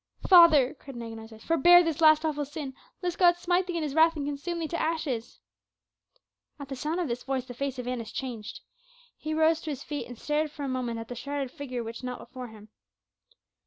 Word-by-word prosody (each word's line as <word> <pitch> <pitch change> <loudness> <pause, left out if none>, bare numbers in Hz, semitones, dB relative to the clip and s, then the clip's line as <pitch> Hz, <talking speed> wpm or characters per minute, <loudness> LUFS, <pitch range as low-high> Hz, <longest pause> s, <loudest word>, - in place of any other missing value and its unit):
"Father," 325 -8 +7
cried 275 -2 -12
an 235 - -6
agonized 225 -1 -8
voice, 220 -1 -14
"forbear 350 +2 +6
this 330 -1 -2
last 310 0 +6
awful 295 -2 -1
sin, 290 -1 -6 0.3
lest 355 -1 -2
God 350 -1 +6
smite 355 +1 +1
thee 350 -2 -2
in 325 - -1
his 295 -3 -3
wrath 325 +2 +5
and 290 -2 -3
consume 290 +4 -4
thee 330 -1 -2
to 340 - -2
ashes!" 305 -8 -3 1.2
At 280 -1 -8
the 270 - -4
sound 305 +6 -2
of 350 - -1
this 240 0 -3
voice 265 -2 -2
the 250 - -8
face 270 +1 -3
of 250 -1 -5
Annas 240 -3 -4
changed. 235 -5 -6 0.5
He 310 0 -4
rose 320 +1 +3
to 315 - -6
his 285 -2 -5
feet 295 -1 -5
and 245 -1 -10
stared 300 +4 -1
for 290 0 -8
a - - -2
moment 250 -3 -2
at 225 - -7
the 245 - -6
shrouded 275 +1 -4
figure 255 -5 -5
which 230 +1 -7
knelt 250 -1 -4
before 255 -2 -9
him. 215 -1 -14
285 Hz, 225 wpm, -28 LUFS, 250-320 Hz, 1.2 s, Father